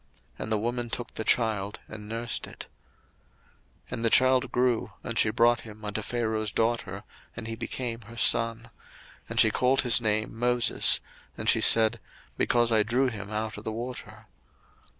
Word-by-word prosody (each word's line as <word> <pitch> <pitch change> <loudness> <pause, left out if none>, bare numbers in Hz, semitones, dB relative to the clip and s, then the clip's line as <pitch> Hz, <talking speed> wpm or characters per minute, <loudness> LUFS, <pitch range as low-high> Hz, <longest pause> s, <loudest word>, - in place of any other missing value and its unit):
And 110 - -5
the 110 - +3
woman 120 +2 -2
took 120 +1 -6
the 110 - -4
child, 105 -4 0
and 105 -1 -9
nursed 115 +1 -3
it. - - -9 1.2
02:002:010 - - -17
And 115 - -4
the 115 - +4
child 130 +2 +4
grew, 125 -4 0
and 115 - -2
she - - +4
brought 120 +2 +3
him 110 -1 -11
unto 105 +1 -3
Pharaoh's 110 -2 -2
daughter, 110 -4 -1 0.3
and 115 - -5
he 115 - -4
became 115 0 -4
her 115 - -11
son. 115 0 +2 0.6
And - - -1
she - - +6
called 130 +1 +2
his 125 -1 +2
name 110 -1 0
Moses: 120 0 +3 0.4
and - - -5
she - - +4
said, 115 0 +4 0.4
Because 120 -1 +2
I 110 -1 +4
drew 125 +5 +1
him 100 -4 -7
out 110 0 -3
of 105 - -9
the 110 - -3
water. 120 +3 -7
115 Hz, 170 wpm, -27 LUFS, 110-120 Hz, 1.2 s, she